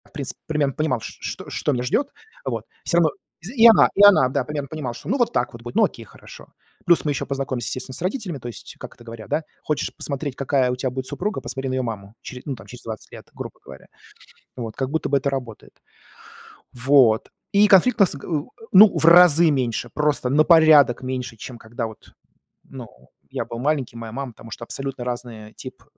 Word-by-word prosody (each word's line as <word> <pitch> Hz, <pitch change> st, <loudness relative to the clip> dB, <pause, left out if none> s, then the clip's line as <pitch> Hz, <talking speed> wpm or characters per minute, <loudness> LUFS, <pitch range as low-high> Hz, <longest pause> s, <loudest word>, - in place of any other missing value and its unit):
В -, -, -24 dB
принципе 140 Hz, -4 st, -6 dB
примерно 150 Hz, -3 st, 0 dB
понимал, 155 Hz, -5 st, -1 dB
ш -, -, -8 dB
ш -, -, -5 dB
что -, -, -1 dB
меня 125 Hz, -3 st, -1 dB
ждет, 265 Hz, -, 0 dB, 0.4 s
вот. -, -, -3 dB, 0.2 s
Всё 170 Hz, -, 0 dB
равно 160 Hz, -3 st, +4 dB, 0.3 s
з 195 Hz, +8 st, -9 dB
и 235 Hz, -2 st, +8 dB
она, 225 Hz, -, +7 dB
и 200 Hz, -, +5 dB
она, 195 Hz, -11 st, +7 dB
да, 135 Hz, 0 st, -1 dB
примерно 145 Hz, +1 st, -5 dB
понимала, 140 Hz, -4 st, -5 dB
шо -, -, -9 dB
ну 260 Hz, -, +1 dB
вот 240 Hz, -3 st, +1 dB
так 120 Hz, -, -1 dB
вот 115 Hz, -, -11 dB
будет, 120 Hz, 0 st, -8 dB
ну -, -, +5 dB
окей, -, -, -7 dB
хорошо. -, -, -15 dB, 0.3 s
Плюс 175 Hz, -2 st, +3 dB
мы 150 Hz, -, +1 dB
еще 140 Hz, -, -3 dB
познакомимся, 135 Hz, -4 st, -3 dB
естественно, 130 Hz, 0 st, -5 dB
с -, -, -8 dB
родителями. 185 Hz, -, -3 dB
То 120 Hz, -, -8 dB
есть, 120 Hz, -, -9 dB
как -, -, -10 dB
это 120 Hz, -, -17 dB
говорят, 115 Hz, -2 st, -10 dB
да: 160 Hz, -, 0 dB, 0.2 s
"Хочешь 150 Hz, -2 st, -2 dB
посмотреть, 140 Hz, -1 st, -4 dB
какая 135 Hz, -2 st, +1 dB
у -, -, -2 dB
тя 130 Hz, +1 st, -2 dB
будет 130 Hz, +1 st, -5 dB
супруга, 210 Hz, +4 st, -3 dB
посмотри 135 Hz, +1 st, -5 dB
на -, -, -2 dB
ее 130 Hz, -, 0 dB
маму", 105 Hz, -3 st, -6 dB
чере 125 Hz, -1 st, -9 dB
ну, 140 Hz, -, -3 dB
там -, -, -14 dB
через 125 Hz, 0 st, -12 dB
20 110 Hz, -2 st, -8 dB
лет, -, -, -12 dB
грубо -, -, -8 dB
говоря. 65 Hz, -1 st, -13 dB, 0.7 s
Вот 115 Hz, -3 st, -6 dB
как 130 Hz, 0 st, -2 dB
будто 160 Hz, +2 st, -1 dB
бы 140 Hz, -, +2 dB
это 140 Hz, +1 st, -1 dB
работает. 125 Hz, -5 st, -6 dB, 1.0 s
Вот. 125 Hz, -3 st, +3 dB, 0.2 s
И 205 Hz, +1 st, +5 dB
конфликт 205 Hz, +5 st, +5 dB
у -, -, +5 dB
нас 180 Hz, -, 0 dB
г 140 Hz, -, -10 dB
у 155 Hz, -3 st, -2 dB, 0.2 s
ну, 200 Hz, +2 st, +8 dB
в -, -, -1 dB
разы 170 Hz, -1 st, +7 dB
меньше, 120 Hz, -3 st, -1 dB
просто 150 Hz, -4 st, 0 dB
на 150 Hz, +4 st, +4 dB
порядок 155 Hz, -7 st, +6 dB
меньше, 130 Hz, -2 st, -4 dB
чем 120 Hz, +3 st, -9 dB
когда 115 Hz, +1 st, -6 dB
вот, 110 Hz, -2 st, -15 dB, 0.5 s
ну, 130 Hz, -3 st, -10 dB, 0.4 s
я -, -, -3 dB
был 115 Hz, 0 st, -7 dB
маленький, 135 Hz, -3 st, -1 dB
моя 115 Hz, -1 st, -7 dB
мама. 135 Hz, 0 st, -5 dB
Потому 115 Hz, +1 st, -14 dB
что 115 Hz, -, -7 dB
абсолютно 135 Hz, +1 st, -5 dB
разный 120 Hz, -3 st, -6 dB
тип, -, -, -11 dB
135 Hz, 220 wpm, -22 LUFS, 120-155 Hz, 1.0 s, и